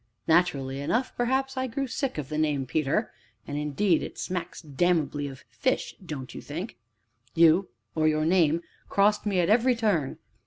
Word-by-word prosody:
Naturally 145 -6 +2
enough, 230 - -1
perhaps, 265 +2 0
I 260 0 -1
grew 275 +3 -2
sick 265 - -3
of 145 -2 -4
the 155 0 -2
name 150 -3 +1
of 130 - -12
Peter 155 - 0 0.3
(and, 145 - -5
indeed, 150 +5 +1
it - - -7
smacks 180 -1 -4
damnably 150 -1 0
of 135 -2 -10
fish, 260 - -1
don't 145 -7 -6
you - - -7
think?) 170 +9 -6 0.6
you, 170 +3 +5 0.2
or 155 -1 +2
your 155 0 +2
name, 170 -1 +3 0.3
crossed 205 +1 +3
me 195 -3 +1
at 170 - +2
every 245 +3 +4
turn. 200 - 0
170 Hz, 170 wpm, -27 LUFS, 150-210 Hz, 0.6 s, you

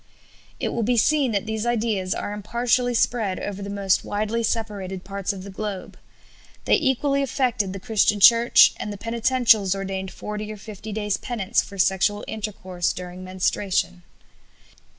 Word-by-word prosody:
" - - -27 0.2
It - - -1
will 235 - -2
be 240 +2 +1
seen 280 +2 +3
that 200 -1 -1
these 220 -1 -3
ideas 220 -6 0
are 205 - -4
impartially 240 +4 0
spread 225 -5 0
over 200 -1 -5
the 200 - -5
most 200 -1 +1
widely 215 +3 -2
separated 205 -5 -3
parts 195 0 -3
of 190 -2 -8
the 200 - -9
globe. 200 -1 -5 0.7
They - - +2
equally 275 0 +2
affected 245 -7 0
the 195 - -6
Christian 210 -1 +2
Church, 235 +2 +7
and 210 - -5
the 205 - -6
Penitentials 230 -3 +2
ordained 190 -1 -4
forty 210 +2 -6
or 215 - -7
fifty 215 +1 -9
days 210 -1 -1
penance 225 -4 -1
for 200 - -11
sexual 195 +2 +1
intercourse 185 -5 -3
during 180 0 -8
menstruation. 185 0 -1
210 Hz, 160 wpm, -23 LUFS, 195-230 Hz, 0.7 s, Church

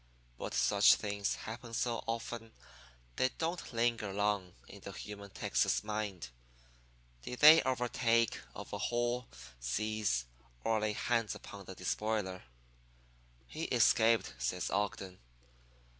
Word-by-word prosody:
'But - - -4
such - - +6
things 100 -1 -2
happen 115 +1 -7
so 120 -1 -1
often 115 0 -4 0.6
they 130 - +3
don't 170 +2 -3
linger 115 -3 0
long 100 -2 0
in 100 - -12
the 100 - -7
human 100 0 -8
Texas - - +1
mind. 105 - -4 0.9
Did 125 - -7
they 155 +2 +10
overtake, 120 -3 +1 0.2
overhaul, 120 +1 -2 0.3
seize, 100 - 0 0.4
or 110 -1 +2
lay 105 0 0
hands 115 -1 0
upon - - -10
the - - -9
despoiler?' 105 -4 -2 1.0
"'He - - -5
escaped,' 110 - +3
says 60 0 -1
Ogden. 95 -2 -2
110 Hz, 115 wpm, -34 LUFS, 100-120 Hz, 1.0 s, they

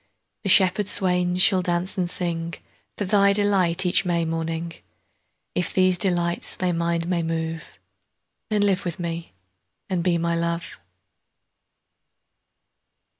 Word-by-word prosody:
The 195 - -3
shepherd 190 +1 +4
swains 180 -2 +3
shall 190 -2 +4
dance 180 +2 -1
and 185 -3 0
singFor 170 -1 -3 0.5
thy 200 0 +4
delight 195 -4 +1
each 180 - +3
May 170 -2 0
morning:If 165 +1 -6
these 185 -1 +4
delights 175 -2 0
thy 185 -1 -1
mind 170 0 -1
may 175 -1 0
move, 165 0 -4 0.7
Then 210 -2 +1
live 200 -1 +1
with 175 -2 -4
me 170 - -5 0.6
and 180 -2 0
be 175 -1 +2
my 170 0 0
Love. 170 0 -3
175 Hz, 120 wpm, -23 LUFS, 170-185 Hz, 0.7 s, shepherd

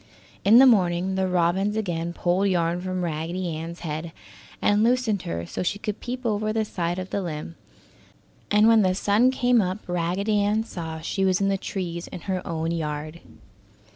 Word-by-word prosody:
In 215 +4 +7
the 265 - +9
morning 185 -5 +3
the 190 0 0
robins 185 +4 +1
again 170 -5 -2
pulled 180 +3 +1
yarn 175 -2 0
from 185 0 -3
Raggedy 170 +1 -3
Ann's 165 +2 -7
head, 160 0 -4 0.5
and 205 0 +3
loosened 235 -4 +2
her 85 0 -3
so - - -5
she 180 +3 -1
could 210 0 -4
peep 250 +1 -6
over 215 -1 0
the 220 0 0
side 175 -3 -2
of 185 0 -6
the 200 - -1
limb, 165 -2 -5 1.0
and 210 +1 +5
when 225 -1 +6
the 185 -2 +2
sun 210 +6 +3
came 245 -2 +3
up 185 0 -1
Raggedy 180 +5 0
Ann 210 +2 +1
saw 160 -7 -6
she 195 +4 -2
was 185 -1 +2
in 195 0 +1
the 195 - +2
trees 175 -4 -4
in 175 - -8
her 185 0 -2
own 165 0 -2
yard. 155 0 -4
185 Hz, 185 wpm, -25 LUFS, 170-210 Hz, 1.0 s, the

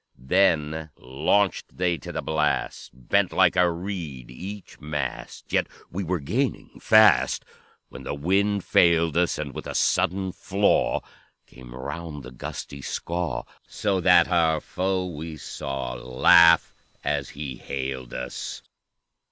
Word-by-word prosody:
"Then 80 0 +1
launched 75 +10 0
they 90 -2 0
to - - -8
the - - -4
blast, 75 -1 -1
Bent 90 +10 0
like 95 -2 +4
a 90 -1 +4
reed 85 -9 -6
each 95 +9 -9
mast, 75 -4 -5
Yet - - +2 0.2
we 95 +3 -3
were 90 0 -1
gaining 120 - -2
fast, 110 -1 +5 0.4
When - - -10
the - - -4
wind 100 +6 +1
failed 85 -2 +3
us; 85 0 +2
And 70 -3 -5
with - - -7
a - - -5
sudden 95 +1 +1
flaw 95 +3 +1 0.4
Came 65 -1 -13
round 75 +2 -6
the - - -10
gusty 70 +2 -7
Skaw, 85 +4 -3 0.2
So 100 -3 -1
that 90 -1 +6
our 80 -3 +2
foe 95 +3 -2
we 80 -2 -6
saw 65 -2 -5
Laugh 80 +7 +5 0.3
as - - -1
he 70 -4 -5
hailed 65 -1 -5
us. 65 0 -6
85 Hz, 135 wpm, -25 LUFS, 70-95 Hz, 0.4 s, that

